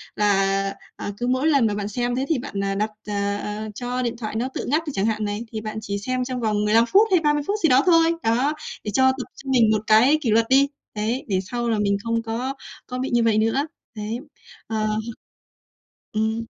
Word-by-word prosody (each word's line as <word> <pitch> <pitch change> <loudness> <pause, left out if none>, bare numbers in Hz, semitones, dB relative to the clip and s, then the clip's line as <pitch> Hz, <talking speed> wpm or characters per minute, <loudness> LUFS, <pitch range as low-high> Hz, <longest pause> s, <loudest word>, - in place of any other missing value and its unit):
Là, 195 -1 +2 0.2
à, 205 - -5
cứ 245 - -2
mỗi 260 +4 +1
lần 280 -7 +4
mà 210 - -1
bạn 205 -1 -3
xem 240 +3 -1
thế 260 +2 -1
thì 320 - +2
bạn, 205 -6 -5
ờ, 195 0 -1
đặt 215 +2 0 0.2
ờ, 200 -1 -1
ờ 210 +1 -5
cho 250 +2 -3
điện 240 -1 -2
thoại 220 -2 -5
nó 240 +3 0
tự - - -4
ngắt 305 +5 +1
đi 295 - -1
chẳng 195 +2 +1
hạn 215 -1 0
này, 205 +2 -3
thì 220 -2 -4
bạn 215 0 -5
chỉ 200 -2 -3
xem 255 +4 -1
trong 250 -1 -4
vòng 210 -2 +1
15 225 +2 +4
phút 410 - +5
hay 365 - +5
30 295 -2 +1
phút 410 - +1
gì 320 - +5
đó 255 +2 +5
thôi. 330 -2 +5
Đó, 245 +6 +2 0.3
để 210 - -3
cho 260 +4 +5
tập 260 -1 -5
cho 275 - -9
mình 235 -4 +5
một 215 -1 +2
cái 235 +8 +6
kỷ 235 - 0
luật 225 +2 +3
đi, 275 +1 +5 0.3
đấy, 225 +5 -2
để 190 -2 +1
sau 240 -1 -1
là 220 -2 +1
mình 200 -1 +2
không 230 0 0
có 235 +4 -3 0.3
có 250 0 -4
bị 260 - -2
như 240 - +4
vậy 225 -2 +3
nữa. 225 +7 +1 0.3
Đấy, 215 +2 -3 0.5
ờ. 215 -1 -1 1.3
Ừm. 220 +1 0
230 Hz, 235 wpm, -23 LUFS, 210-260 Hz, 1.3 s, cái